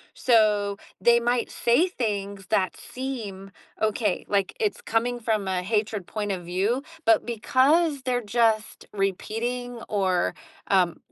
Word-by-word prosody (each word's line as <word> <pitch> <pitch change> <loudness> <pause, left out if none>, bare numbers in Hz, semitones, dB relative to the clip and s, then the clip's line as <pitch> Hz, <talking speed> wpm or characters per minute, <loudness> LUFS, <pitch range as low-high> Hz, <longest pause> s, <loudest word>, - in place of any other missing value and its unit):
so 210 -4 +3 0.2
they 235 0 +5
might 240 0 0
say 245 +10 +3
things 200 - -3
that 190 -4 +1
seem 220 -7 -6 0.3
Okay, 215 -2 0
like, 200 -2 0
it's 450 +2 -1
coming 245 - 0
from 220 -4 -1
a 185 -1 0
hatred 210 -1 -1
point 210 -2 -3
of 185 -2 -3
view, 195 +9 0 0.2
but 335 -1 +4
because 275 +6 +2
they're 250 -1 0 0.2
just 220 -1 +1
repeating 230 +5 -2
or, 190 -3 +1 0.4
um, 180 -3 +3
220 Hz, 130 wpm, -25 LUFS, 200-245 Hz, 0.4 s, they